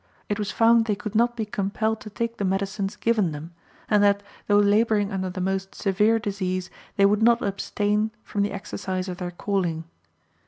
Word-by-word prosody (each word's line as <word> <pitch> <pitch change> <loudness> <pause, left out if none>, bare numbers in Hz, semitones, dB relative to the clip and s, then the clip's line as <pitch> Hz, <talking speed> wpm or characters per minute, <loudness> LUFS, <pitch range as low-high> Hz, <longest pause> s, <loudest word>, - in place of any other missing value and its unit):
It 205 - -1
was 205 -2 -2
found 230 0 +4
they 210 -2 0
could 210 +1 -6
not 240 +2 +2
be 220 - -1
compelled 215 +2 -1
to 215 - -8
take 230 +2 -3
the - - -2
medicines 195 +1 -1
given 215 -8 +1
them; 155 +4 -8 0.3
and 210 -1 +3
that, 200 0 +3 0.2
though 205 - +4
laboring 205 0 +3
under 190 -1 -2
the 185 - -6
most 190 +1 -2
severe 210 +4 +2
disease, 190 -4 -3 0.2
they 200 - +5
would 205 +2 +3
not 235 +1 +4
abstain 205 +2 0
from 205 - -2
the 200 - 0
exercise 190 -1 -4
of 180 -1 -5
their 180 -1 -4
calling. 175 -3 -2
205 Hz, 190 wpm, -25 LUFS, 190-215 Hz, 0.3 s, they